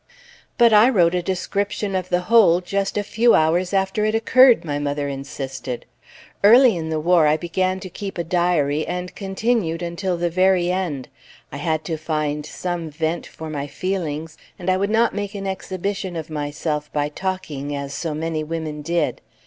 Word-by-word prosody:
"But 235 -2 +6
I 215 +4 +7
wrote 175 -8 +3
a 180 - +1
description 200 +3 -2
of 185 -1 -2
the 180 0 +1
whole, 195 -4 +5
just 195 +3 -2
a 205 - +1
few 230 +3 +3
hours 170 +3 +2
after 195 +1 0
it 215 +1 +1
occurred!" 235 -3 +5
my 145 -2 -2
mother 145 0 -2
insisted. 135 -2 -5 0.6
"Early 235 +2 +7
in 160 -2 -4
the 160 -1 -1
war 170 -1 +4
I 150 +1 +3
began 185 +3 -1
to 190 - -6
keep 195 +2 -7
a 170 - -1
diary, 165 -4 +1
and 180 0 -4
continued 195 -4 -1
until 175 +1 -2
the 175 0 -1
very 185 0 +3
end; 170 -8 -2 0.4
I 140 - -6
had 155 +1 -1
to 160 -1 -2
find 150 -1 -2
some 175 -3 -4
vent 160 +3 -2
for 160 - -9
my 145 -2 -4
feelings, 165 -3 -4 0.2
and 185 0 -1
I 185 - +2
would 200 +2 0
not 225 +2 +2
make 205 0 -4
an 195 -1 -5
exhibition 190 0 -3
of 160 -1 -6
myself 150 0 -3
by 145 -1 0
talking, 150 -5 -4
as 140 0 -5
so 160 -1 -3
many 160 0 -2
women 155 -1 -4
did. 170 +1 -1
175 Hz, 180 wpm, -22 LUFS, 155-195 Hz, 0.6 s, I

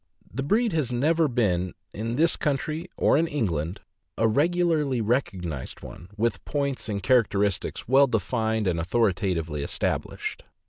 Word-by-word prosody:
The 135 - -2
breed 215 - +1
has 150 -7 0
never 155 +6 +2
been, 95 -8 0 0.2
in 115 +3 -3
this 160 +4 +4
country 155 +4 -2
or - - +4
in 165 - +2
England, 90 - -2 0.4
a 115 - +3
regularly 150 0 +2
rec 120 +5 +2
ognized 85 -8 -6
one, 85 - -10
with 110 -2 0
points 140 -5 -2
and 100 -2 -3
characteristics 105 -4 +1
well 135 +3 +6
defined 110 -1 0
and 85 -3 +1
authoritatively 90 -6 0
established. 70 - -3
115 Hz, 140 wpm, -26 LUFS, 95-145 Hz, 0.4 s, well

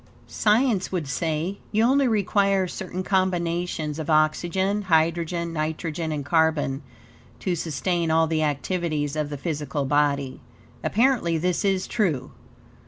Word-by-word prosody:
Science 215 -2 +1
would 175 -6 -2
say, 160 +7 -2
you 220 +1 +2
only 270 +3 +4
require 200 -3 +2
certain 185 +1 -5
combinations 175 -4 -1
of 155 - -5
oxygen, 175 +6 +2
hydrogen, 170 +1 +1
nitrogen, 160 +1 -3
and 145 -2 -3
carbon, 155 -3 +1 0.6
to 180 -2 -1
sustain 165 +2 -1
all 160 0 +4
the 160 0 0
activities 150 0 -1
of 150 -1 -1
the 145 - -5
physical 145 -1 -3
body. 140 -1 +1 0.4
Apparently, 225 -8 +2
this 180 +2 0
is 195 -2 +1
true. 160 - -1
165 Hz, 125 wpm, -24 LUFS, 155-190 Hz, 0.6 s, only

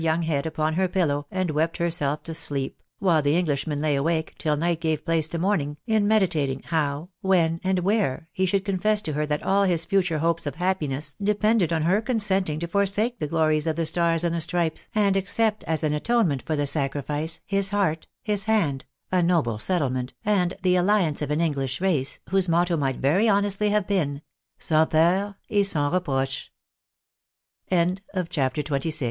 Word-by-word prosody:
195 165 +1 +1
young 160 -2 0
head 140 +3 -1
upon 155 0 -1
her 185 +3 +1
pillow 145 -6 0
and 185 -3 -1
wept 160 +2 0
herself 155 -4 -1
to 165 - -6
sleep, 140 -4 -3 0.2
while 175 -6 +2
the 145 +3 +2
Englishman 150 -3 -1
lay 150 -1 +1
awake, 160 +3 -1
till 150 -2 0
night 165 +1 0
gave 160 -2 -1
place 165 -2 +1
to 170 - -4
morning, 165 -5 0
in 220 -3 +2
medi 215 -2 +4
tating 140 -6 -2
how, 155 0 -1
when, 170 -4 +2
and 190 0 +1
where, 180 -6 0
he 190 - -1
should 195 +2 0
confess 210 +2 +1
to 160 -7 -3
her 150 +1 -1
that 150 0 -2
all 200 +1 +2
his 170 -3 +1
future 185 -4 +1
hopes 165 0 0
of 145 - -4
happiness 155 -6 -1
depended 210 -2 +2
on 160 -2 +1
her 190 +6 +2
consenting 195 - -1
to 170 - -3
forsake 205 +6 +1
the 150 - -2
glories 155 0 +1
of 160 - 0
the 165 0 -1
Stars 165 +1 +1
and 170 -1 0
the 170 - -1
Stripes, 165 0 -1
and 200 -2 +3
accept 210 +3 0
as 160 0 -1
an 150 -1 +1
atone 230 +8 +2
ment 140 -3 -2
for 155 - -2
the 145 -1 0
sacrifice, 145 +2 -2
his 195 -1 +2
heart, 190 -6 0 0.2
his 205 -2 0
hand, 165 -12 +1 0.3
a 185 -1 +3
noble 165 -11 +1
settlement, 130 -5 -1
and 185 -4 +1
the 180 -1 +3
alliance 180 -5 +2
of 150 - -2
an 150 +1 0
ancient - - +3
English 135 -4 -2
race, 160 -8 +1
whose 190 -2 +1
motto 175 +1 +2
might 135 -4 -1
very 185 +12 +2
165 Hz, 170 wpm, -24 LUFS, 150-190 Hz, 0.3 s, medi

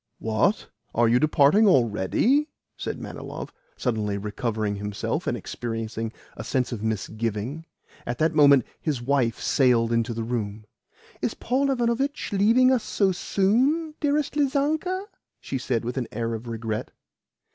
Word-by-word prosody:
"What? 110 - 0 0.3
Are 120 0 +4
you 120 +2 +4
departing 155 - +5
already?" 135 - +3 0.3
said - - -5
Manilov, - - -7 0.2
suddenly 105 -3 -1
recovering 105 0 -2
himself, 105 0 -3
and - - 0
experiencing 115 -1 -4 0.2
a - - -6
sense 130 -1 -1
of 115 -4 -4
misgiving. 110 - -3 0.4
At 120 0 -2
that 160 +1 +2
moment 140 -5 +6 0.2
his 150 -6 -1
wife 120 -2 +1
sailed 120 -4 +3
into 115 0 0
the 115 - -2
room. 110 -3 -3 0.6
"Is - - -1
Paul 270 +3 0
Ivanovitch 260 +2 0
leaving 230 +6 +5
us 255 -3 +3
so 195 -2 +1
soon, 255 - +1
dearest 295 -1 0
Lizanka?" 305 +7 0 0.3
she 135 - -4
said 120 -3 -1
with 125 +2 -3
an 125 -3 -1
air 115 +1 -2
of 115 +2 -6
regret. 115 -1 -3
125 Hz, 140 wpm, -25 LUFS, -, 0.6 s, moment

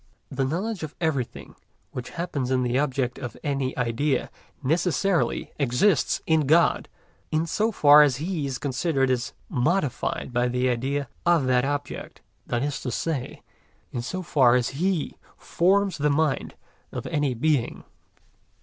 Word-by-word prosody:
The 135 0 0
knowledge 185 +8 -2
of 155 -1 -6
everything 145 -8 -2 0.4
which 125 -2 -6
happens 150 -7 -2
in 130 -1 +2
the 125 +1 +1
object 130 -3 -1
of 120 -5 -6
any 135 -3 -2
idea 125 +3 0 0.3
necessarily 175 +5 0
exists 140 +6 +2
in 160 -3 +2
God, 165 +3 +3 0.4
in 155 +1 +1
so 215 +7 0
far 150 -6 +7
as 145 -4 +4
He 155 +1 -2
is 130 -2 -3
considered 135 0 0
as 125 0 -1
modified 140 -3 -1
by 120 +1 +2
the 125 +1 +1
idea 135 +3 -1 0.2
of 170 -5 +3
that 125 0 +2
object; 145 0 -4 0.3
that 120 +1 -1
is 145 -1 -2
to 125 - -3
say, 135 +1 -3 0.5
in 120 - -3
so 185 +10 -4
far 130 -7 +4
as 125 -2 +1
He 170 +3 -1 0.2
forms 195 +1 +1
the 150 +1 +2
mind 150 -1 0 0.4
of - - -5
any 145 -5 0
being. 145 0 0
140 Hz, 150 wpm, -25 LUFS, 125-160 Hz, 0.5 s, far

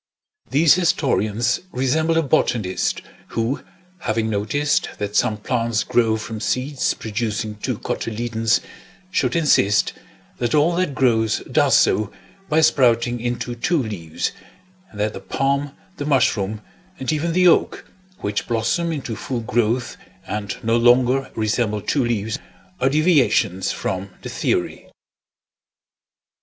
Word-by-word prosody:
These 150 +2 +5
historians 120 - +1
resemble 155 +5 +1
a 165 - +3
botanist 110 -8 0 0.2
who, 115 +5 -2 0.4
having 110 -5 -1
noticed 145 +9 0
that 105 0 -4
some 105 - +2
plants 115 0 -1
grow 115 -3 +2
from 110 0 -6
seeds 130 +5 -1
producing 110 -1 -3
two - - -3
cotyledons, 115 +1 -1 0.5
should - - 0
insist 105 -11 +3 0.5
that 120 +3 0
all 155 +4 +3
that 180 -7 0
grows 110 -4 +2
does - - +4
so 105 -1 +2 0.4
by 155 0 +3
sprouting 120 -5 +3
into 120 +1 -3
two 160 +9 0
leaves, 100 - -3 0.6
and 105 - -12
that 105 +1 0
the - - -6
palm, 140 +1 -1 0.2
the 145 - -4
mushroom, 110 -6 +1 0.4
and 130 +4 -1
even 160 +2 -1
the 180 +1 +4
oak, 170 - +2 0.4
which 105 0 -2
blossom 120 +9 0
into 135 -7 -4
full 120 +3 -4
growth 115 +2 0 0.3
and 105 -1 -4
no 115 +1 +2
longer 125 +3 +3
resemble 110 0 0
two 135 +6 0
leaves, 110 -2 -1 0.4
are 135 - +3
deviations 135 - +2
from 95 +1 -3
the - - -5
theory. - - -2
120 Hz, 125 wpm, -21 LUFS, 110-140 Hz, 0.6 s, These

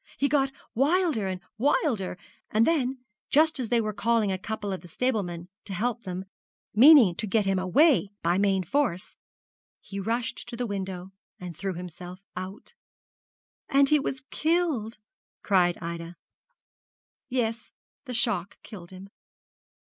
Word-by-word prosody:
He 280 - +2
got 275 -1 +2 0.2
wilder 290 - +2
and 185 -1 -4 0.2
wilder; 235 - +1 0.3
and 220 +2 +3
then, 265 -5 0 0.3
just 315 0 +4
as 240 -4 -3
they 240 - +3
were 215 -1 -1
calling 225 -1 +1
a 190 - -1
couple 205 -1 -4
of 185 - -5
the 175 - -12
stablemen 180 -5 -2 0.2
to 195 - -5
help 235 +3 -2
them, 185 +1 -5 0.5
meaning 245 - +8
to 215 +5 -3
get 210 +1 +2
him 195 -1 +1
away 240 - +4
by 175 +2 +2
main 195 -2 +2
force, 255 -8 -1 0.6
he 200 - -7
rushed 230 +4 -2
to 235 - -6
the 245 - -1
window 190 -3 -5 0.3
and 180 -2 -7
threw 190 +2 -3
himself 180 +1 -8 0.2
out.' 185 +3 -7 1.0
'And 275 -1 +4
he 300 - +5
was 265 -1 -4
killed!' 310 -10 0 0.5
cried 180 -3 +3
Ida. 170 0 -6 1.1
'Yes; 235 -3 -1 0.4
the 250 -2 -3
shock 220 -6 0
killed 180 -6 -10
him. 190 +1 -10
215 Hz, 145 wpm, -27 LUFS, 185-260 Hz, 1.1 s, meaning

